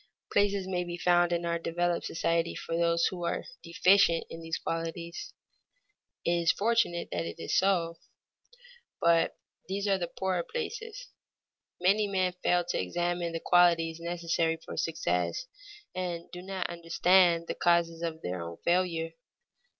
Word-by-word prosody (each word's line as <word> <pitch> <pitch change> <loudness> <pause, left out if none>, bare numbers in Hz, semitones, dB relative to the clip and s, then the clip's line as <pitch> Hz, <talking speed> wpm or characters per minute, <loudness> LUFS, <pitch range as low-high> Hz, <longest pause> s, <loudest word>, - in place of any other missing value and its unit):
Places 200 -1 +2
may 180 -1 -1
be 175 0 -5
found 175 0 +3
in 170 0 0
our 170 0 0
developed 175 +1 -1
society 165 0 0
for 165 - -4
those 170 0 +2
who 180 -2 -2
are 170 - -2 0.2
deficient 170 0 +4
in 165 - -7
these 165 0 -3
qualities 165 +1 -4 0.9
(it - - +2
is 170 -1 +3
fortunate 220 -5 +1
that 85 -1 -2
it 85 - -6
is 85 - -2
so), 170 -4 +2 1.0
but 170 0 +3 0.3
these 200 +2 -2
are 195 -1 +2
the 175 - -2
poorer 185 0 -1
places. 460 - -6 0.7
Many 200 +4 +3
men 185 -2 0
fail 175 -1 +2
to - - 0
examine 175 - -1
the 165 - -3
qualities 170 -2 +3
necessary 170 -1 -1
for 165 - -9
success, 90 - -1 0.5
and 175 -2 -4
do 180 - -7
not 190 0 -4
understand 170 0 +3
the - - -3
causes 170 -1 +2
of 165 -1 -4
their 90 0 -3
own 85 0 -7
failure. 170 -2 +1
170 Hz, 150 wpm, -29 LUFS, 165-185 Hz, 1.0 s, deficient